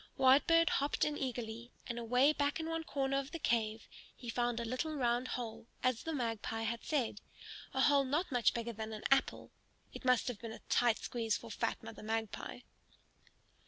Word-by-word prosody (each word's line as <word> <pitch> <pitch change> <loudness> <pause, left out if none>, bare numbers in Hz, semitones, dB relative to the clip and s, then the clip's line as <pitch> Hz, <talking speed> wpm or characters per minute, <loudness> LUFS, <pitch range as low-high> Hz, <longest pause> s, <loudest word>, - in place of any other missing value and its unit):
Whitebird 295 +6 +6
hopped 285 +1 +1
in 300 - -1
eagerly, 240 -3 -4 0.2
and 240 0 -4
away 250 +5 +4
back 285 +1 0
in 320 - -3
one 325 0 -2
corner 275 -2 0
of 275 0 -5
the 335 - -5
cave 225 -6 0 0.3
he 240 - -8
found 240 0 0
a 235 - -2
little 255 +7 -2
round 245 -2 +1
hole, 230 -2 -5 0.2
as 255 -2 +2
the 325 - -3
Magpie 225 -4 -2
had 230 +1 -2
said; 250 -8 -1 0.5
a 265 - 0
hole 280 0 +5
not 295 +6 0
much 245 -3 +3
bigger 235 0 -3
than 220 0 -5
an 215 - -7
apple. 270 0 +2 0.4
It - - -8
must 255 -2 +3
have 245 -5 -3
been 230 -1 -6
a - - -9
tight 240 -2 +4
squeeze 225 -3 -1
for - - -10
fat - - -2
Mother - - -9
Magpie! 220 +2 -3
245 Hz, 190 wpm, -35 LUFS, 230-275 Hz, 0.5 s, Whitebird